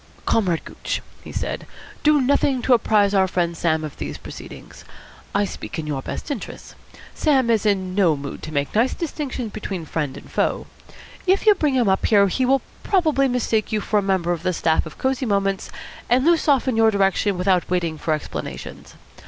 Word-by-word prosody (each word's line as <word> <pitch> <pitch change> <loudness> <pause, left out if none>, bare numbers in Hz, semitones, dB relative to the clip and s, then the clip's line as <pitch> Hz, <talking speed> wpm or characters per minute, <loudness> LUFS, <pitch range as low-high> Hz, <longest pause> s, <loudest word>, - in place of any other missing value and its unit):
"Comrade 180 -7 +1
Gooch," - - -4 0.2
he - - -9
said, - - -4 0.3
"do 300 0 +4
nothing 260 -1 +2
to 260 - +4
apprise 210 -3 +3
our 190 -1 +4
friend 175 -2 -1
Sam 160 -1 0
of 150 - -7
these - - -5
proceedings. - - -11 0.5
I 200 0 +3
speak - - -7
in 160 - -3
your 145 -3 -3
best 290 - -5
interests. 255 -8 -7 0.4
Sam 265 -6 +2
is 220 -2 +2
in 190 -3 0
no 180 -6 +3
mood 140 0 -7
to 155 - -7
make 145 -1 -1
nice 235 +4 +2
distinctions 275 -8 -4
between 195 -5 -5
friend 150 -3 -3
and - - -13
foe. - - 0 0.6
If 385 +3 +3
you 425 - +8
bring 300 -8 0
him 245 -4 +2
up 190 0 +2
here, 200 -2 +5
he 255 +7 0
will 270 +1 +3 0.2
probably 310 -8 +2
mistake 230 -4 0
you 215 - +1
for 210 0 +1
a - - 0
member 190 -3 0
of 170 -2 -2
the 185 +1 0
staff 160 -1 +1
of 155 - -12
Cosy 265 -1 -1
Moments, 195 -2 0 0.4
and 255 +3 +3
loose 335 -1 +3
off 275 -3 +3
in 255 - +1
your 225 0 +5
direction 200 -1 +1
without 180 -1 +1
waiting 170 -3 -1
for 155 - +1
explanations. 150 - -7
205 Hz, 195 wpm, -22 LUFS, 175-260 Hz, 0.6 s, you